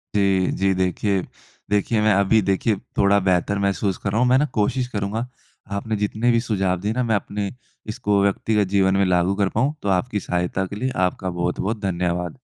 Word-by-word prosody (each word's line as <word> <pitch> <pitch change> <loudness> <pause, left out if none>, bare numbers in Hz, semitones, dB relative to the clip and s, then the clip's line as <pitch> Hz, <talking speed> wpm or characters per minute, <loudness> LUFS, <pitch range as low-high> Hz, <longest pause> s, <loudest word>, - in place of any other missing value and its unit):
जी, 95 -2 +2
जी, 95 0 +1
देखिए, 95 +1 0 0.5
देखिए, 105 +2 +1
मैं 110 0 +4
अभी 100 +3 +3
देखिए 100 +3 +1 0.2
थोड़ा 100 +1 +4
बेहतर 95 +2 +1
महसूस 100 -1 0
कर 100 - -3
रहा 110 - 0
हूँ, 125 - +4
मैं 130 - +5
ना 150 - +3
कोशिश 125 +4 0
करूँगा, 105 +1 -3 0.5
आपने 105 +2 -2
जितने 110 +4 +1
भी 115 - +3
सुझाव 95 -6 0
दिए 105 +3 -2
ना 125 - 0
मैं 115 -2 +1
अपने, 100 0 -3 0.4
इसको 105 -2 0
व्यक्तिगत 100 0 +1
जीवन 95 0 +3
में 100 - +3
लागू 90 +1 +2
कर 100 -2 +1
पाऊँ। 130 +7 0
तो 100 - -2
आपकी 100 +3 0
सहायता 90 +1 -1
के 100 - -7
लिए 130 +5 -2 0.2
आपका 95 +1 -5
बहुत-बहुत 90 +5 -2
धन्यवाद। 90 -2 -2
100 Hz, 190 wpm, -22 LUFS, 95-110 Hz, 0.5 s, मैं